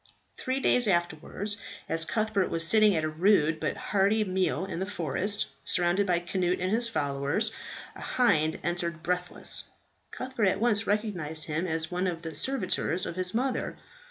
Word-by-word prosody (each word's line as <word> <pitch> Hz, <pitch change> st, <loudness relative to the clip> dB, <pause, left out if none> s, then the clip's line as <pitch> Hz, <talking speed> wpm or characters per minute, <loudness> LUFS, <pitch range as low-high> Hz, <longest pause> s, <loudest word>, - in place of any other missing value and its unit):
Three 260 Hz, +1 st, -2 dB
days 245 Hz, -2 st, +3 dB
afterwards, 175 Hz, +3 st, -1 dB, 0.3 s
as 165 Hz, 0 st, +1 dB
Cuthbert 215 Hz, -2 st, 0 dB
was 165 Hz, 0 st, +2 dB
sitting 215 Hz, +1 st, +5 dB
at 160 Hz, -, 0 dB
a -, -, 0 dB
rude 160 Hz, -1 st, +2 dB
but -, -, -2 dB
hearty 205 Hz, +2 st, +1 dB
meal 185 Hz, -4 st, -1 dB
in 175 Hz, -, -5 dB
the 190 Hz, -, -3 dB
forest, 200 Hz, +4 st, -1 dB, 0.2 s
surrounded 180 Hz, +3 st, +3 dB
by 175 Hz, -2 st, +2 dB
Cnut 180 Hz, 0 st, -1 dB
and 185 Hz, +1 st, -1 dB
his 230 Hz, +2 st, +3 dB
followers, 145 Hz, +5 st, 0 dB, 0.4 s
a -, -, -10 dB
hind 160 Hz, -11 st, +1 dB
entered 170 Hz, -1 st, -2 dB
breathless. 180 Hz, 0 st, 0 dB, 0.4 s
Cuthbert 255 Hz, -4 st, -3 dB
at 190 Hz, -, +1 dB
once 225 Hz, -2 st, +2 dB
recognized 180 Hz, -8 st, -1 dB
him 160 Hz, +4 st, -2 dB
as 160 Hz, 0 st, 0 dB
one 180 Hz, +1 st, -1 dB
of 170 Hz, -2 st, -4 dB
the 160 Hz, -1 st, -6 dB
servitors 185 Hz, -, 0 dB
of -, -, -5 dB
his 185 Hz, +2 st, 0 dB
mother. 255 Hz, +1 st, -1 dB
185 Hz, 165 wpm, -28 LUFS, 165-210 Hz, 0.4 s, sitting